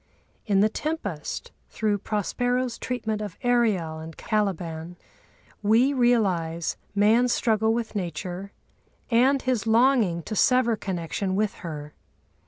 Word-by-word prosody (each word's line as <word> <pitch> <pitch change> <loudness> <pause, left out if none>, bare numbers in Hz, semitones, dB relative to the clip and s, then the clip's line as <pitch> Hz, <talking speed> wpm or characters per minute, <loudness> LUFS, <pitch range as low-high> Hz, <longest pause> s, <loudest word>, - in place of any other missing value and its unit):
In 200 -2 +3
the 210 - +5
Tempest, 215 - -4 0.2
through 210 -2 0
Prospero's 245 +4 -1
treatment 220 -4 -3
of 205 -5 -6
Ariel 215 -10 +1
and 160 0 -9
Caliban 175 -5 -2 0.7
we 230 +7 +4
realise 190 - +1 0.2
man's 225 +4 +4
struggle 220 -1 +2
with 230 0 -2
Nature 180 +1 -4 0.6
and 260 +4 +4
his 250 -4 0
longing 225 -7 +3
to 215 - -5
sever 250 +1 +3
connection 185 0 -3
with 210 +1 +1
her. 150 -3 -7
210 Hz, 115 wpm, -25 LUFS, 175-240 Hz, 0.7 s, the